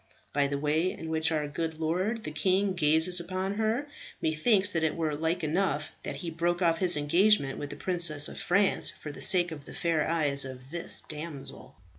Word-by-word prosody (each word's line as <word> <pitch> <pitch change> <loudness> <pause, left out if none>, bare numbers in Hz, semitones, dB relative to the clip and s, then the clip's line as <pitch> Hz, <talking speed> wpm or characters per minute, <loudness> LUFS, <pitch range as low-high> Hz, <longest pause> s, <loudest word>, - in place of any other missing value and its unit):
"By 140 -1 +2
the 140 0 -3
way 155 +5 0
in 160 - -8
which 160 0 +1
our 150 -2 -1
good 160 +2 -5
lord, 185 +8 -2
the 150 - -5
king, 190 +5 0
gazes 160 +2 +4
upon 185 +3 -4
her, 225 +5 -1 0.3
methinks 190 +6 +2
that 165 - -1
it 160 -1 0
were 160 -2 -2
like 160 +3 -2
enough 155 -2 -1
that - - -5
he 165 - -4
broke 170 +2 -1
off 165 -1 +2
his 180 -4 +4
engagement 150 0 +2
with 145 - -6
the 145 - -7
Princess 170 -3 +3
of - - -9
France, 195 +2 +2
for 150 - -9
the - - -11
sake 175 -2 +4
of 145 -3 -9
the - - -11
fair 165 -3 -1
eyes 145 -4 +3
of 130 0 -10
this 170 0 +1
damsel." 150 -2 -8
165 Hz, 200 wpm, -28 LUFS, 150-180 Hz, 0.3 s, gazes